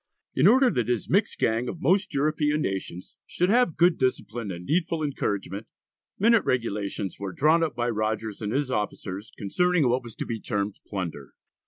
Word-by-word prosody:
In 135 +7 +4
order 255 +3 +6
that 120 -3 0
his 120 -5 -1
"mixed - - +2
gang 115 +2 +1
of 170 - -6
most 185 +7 +2
European 150 +1 +1
nations," 95 -2 -5
should 180 +1 0
have 240 -8 +3
"good 175 0 +4
discipline" 120 -4 -1
and 90 -1 -6
"needful 165 - 0
encouragement," 100 - -3 0.5
minute 230 +2 +4
regulations 105 -6 -2
were 100 -1 -4
drawn 155 - +3
up 160 - -2
by 120 0 -1
Rogers 110 -1 -2
and 105 -1 -2
his 135 +1 0
officers 105 -2 -3
concerning 170 - +2
what 125 +2 +2
was 120 -3 -11
to - - -4
be 115 -1 -4
termed 100 -1 -3
plunder. 85 - -5
120 Hz, 175 wpm, -26 LUFS, 105-155 Hz, 0.5 s, order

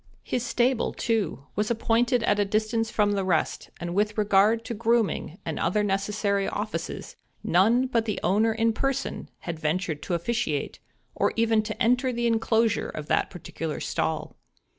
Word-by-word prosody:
His 245 - -2
stable, 240 +1 +1
too, 205 - -1
was 210 +1 0
appointed 235 +1 +2
at 205 -2 +2
a - - +4
distance 215 +2 0
from 210 -2 +2
the 200 -1 0
rest; 175 -4 0
and 175 0 -4
with 210 +2 0
regard 210 +2 +3
to 240 - -3
grooming 225 -6 0
and 160 - -3
other 210 +5 +1
necessary 200 0 0
offices, 205 -5 -4 0.3
none 225 +9 +4
but 235 -3 0
the 210 - -2
owner 215 +5 +3
in 225 0 +1
person 270 +3 -2
had 170 -2 -5
ventured 160 0 -1
to 175 - -2
officiate, 170 -5 -2 0.3
or - - +1
even 225 -1 +3
to 215 0 -6
enter 250 +2 +3
the 240 0 -2
enclosure 225 -1 +2
of 155 - -6
that - - +2
particular 165 -3 -5
stall. 160 -1 -2
215 Hz, 160 wpm, -26 LUFS, 190-230 Hz, 0.3 s, a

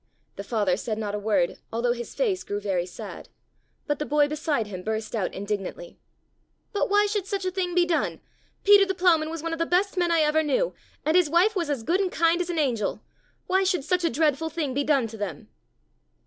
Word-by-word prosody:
The 200 - -6
father 205 -4 0
said 215 0 -3
not 210 -2 -3
a 210 - -2
word 200 -4 0
although 235 +2 0
his 240 -1 -7
face 395 -7 0
grew 205 - -3
very 190 -4 -1
sad, 180 - -9 0.6
but 290 - -1
the - - 0
boy 295 0 +3
beside 300 -5 -1
him 190 -3 -7
burst 220 +3 -3
out 195 -5 -1
indignantly. 205 - -5 0.7
"But 410 - 0
why 410 +1 +4
should 410 -2 -2
such 395 -2 -2
a 370 - 0
thing 360 -2 -2
be 355 -1 +4
done? 345 -2 0 0.4
Peter 405 0 +7
the 385 -1 -1
Ploughman 335 -4 +3
was 325 -1 -6
one 330 0 -2
of 330 - -4
the 330 - +2
best 380 +2 +1
men 350 -1 +2
I 330 -1 +4
ever 305 +1 +3
knew - - 0 0.3
and 310 +2 +2
his 360 -4 +4
wife 360 +7 +3
was 340 -5 -1
as 275 -6 -2
good 350 +10 +1
and 375 -2 -1
kind 335 +2 +2
as 355 - -3
an 345 - -2
angel. 245 -9 0 0.4
Why 380 +1 +2
should 365 -5 +1
such 360 +4 0
a 335 - +3
dreadful 310 0 +1
thing 305 -5 -2
be 285 +2 0
done 275 -4 +2
to 225 0 -8
them?" 190 -8 -6
310 Hz, 225 wpm, -26 LUFS, 225-360 Hz, 0.7 s, Peter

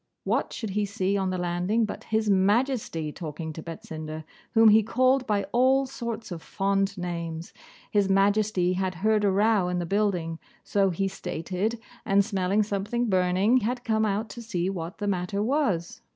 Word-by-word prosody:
What - - 0
should 220 -4 -5
he 210 +2 0
see 200 -1 -1
on 190 -1 0
the 185 - -2
landing 180 +6 0
but 210 - -7
His 220 -1 0
Majesty 200 - +1
talking 160 0 -6
to 160 - -7
Betsinda, 155 -1 -7 0.3
whom 225 -1 +7
he 215 +1 +6
called 255 +4 +2
by 205 -2 +1
all 260 +3 +4
sorts 235 -5 -6
of 170 -2 -5
fond 195 +1 -1
names. 170 -2 -5 0.4
His 200 -2 +2
Majesty 195 -2 +2
had 185 0 -2
heard 215 -1 +3
a 200 - +4
row 200 -1 +2
in 180 - -1
the 175 - -2
building, 180 -4 0 0.2
so 195 -1 +2
he 195 +2 -1
stated, 190 +4 -3 0.2
and 200 -1 +3
smelling 200 0 +1
something 210 +4 -2
burning, 185 +6 +3
had 245 +1 -1
come 220 -2 +1
out 210 +2 -1
to 235 - -8
see 190 -5 -2
what 175 0 -6
the 210 - -4
matter 200 +1 -1
was. 220 - 0
200 Hz, 175 wpm, -26 LUFS, 180-220 Hz, 0.4 s, whom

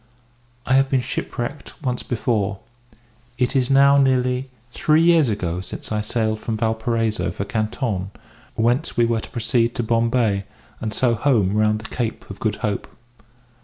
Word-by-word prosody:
I 130 - +1
have 135 0 +4
been 135 -2 +2
shipwrecked 125 +3 -5
once 125 -2 -1
before. 110 -4 -1 0.8
It 130 +2 0
is 130 -1 +2
now 140 +1 +6
nearly 130 -1 +1 0.2
three 155 +1 +3
years 165 -6 +5
ago 90 -4 -2
since 95 - -7
I 105 -1 0
sailed 110 0 -1
from 110 0 -3
Valparaiso 110 0 0
for 100 - -4
Canton, 110 -2 -2 0.5
whence 120 +4 +1
we 120 - +5
were 115 -1 0
to - - -10
proceed 120 -1 0
to 120 - -1
Bombay, 115 -3 +1 0.3
and 110 - -3
so 120 +1 +2
home 110 -5 +2
round 105 0 +2
the 110 - -9
Cape 115 -3 -3
of 100 - -9
Good 110 -2 0
Hope. 105 -2 -2
115 Hz, 160 wpm, -22 LUFS, 110-130 Hz, 0.8 s, now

